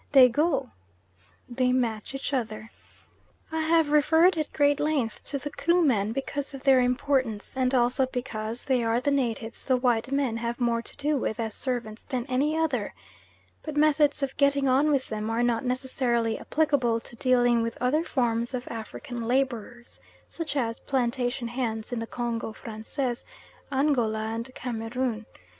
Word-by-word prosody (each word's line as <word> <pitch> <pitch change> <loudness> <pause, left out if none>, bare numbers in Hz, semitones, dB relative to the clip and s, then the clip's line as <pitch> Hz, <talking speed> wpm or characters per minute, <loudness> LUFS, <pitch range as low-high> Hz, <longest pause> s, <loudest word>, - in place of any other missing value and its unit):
They 260 -2 +9
go" 275 0 0 0.8
(they 250 +1 +1
match 240 -1 -1
each 270 +1 -4
other). 220 -3 -3 0.8
I 320 - -1
have 320 -1 +3
referred 320 +5 +5
at 310 -2 -2
great 290 -1 +3
length 290 -7 -1
to 285 - -2
the 290 +1 -6
Krumen 275 - +2
because 275 +3 -4
of 265 - -10
their 270 -2 +6
importance, 250 -3 0
and 255 -1 +1
also 250 +2 +2
because 235 -3 -4
they 255 -3 +2
are 230 +1 +2
the 285 +3 0
natives 235 -4 -1
the 260 -2 +2
white 245 0 +1
men 275 -5 0
have 235 +1 -3
more 235 -1 +1
to - - -10
do 290 +1 +1
with 230 -3 -2
as 220 -2 -2
servants 235 -4 -3
than 250 -2 -3
any 285 +5 +1
other; 280 -10 -1 0.7
but 305 -2 -6
methods 295 -1 +3
of 270 - -2
getting 280 -1 +3
on 270 +4 +4
with 275 -3 +1
them 215 0 -3
are 230 +1 +1
not 240 +1 +1
necessarily 250 -3 0
applicable 275 -7 +1
to 235 - -10
dealing 245 -2 +3
with 230 0 -3
other 280 +6 +2
forms 240 -4 0
of 250 0 -5
African 235 +1 -6
labourers, 240 -2 -2 0.3
such 320 -4 -4
as 230 -3 -1
plantation 245 -1 -1
hands 230 -2 -3
in 240 - -1
the 230 - -4
Congo 235 -2 -3
Francais, 235 +4 -4 0.5
Angola, 265 -6 +2
and 230 +3 -5
Cameroon. 230 -1 -3
250 Hz, 160 wpm, -27 LUFS, 230-280 Hz, 0.8 s, They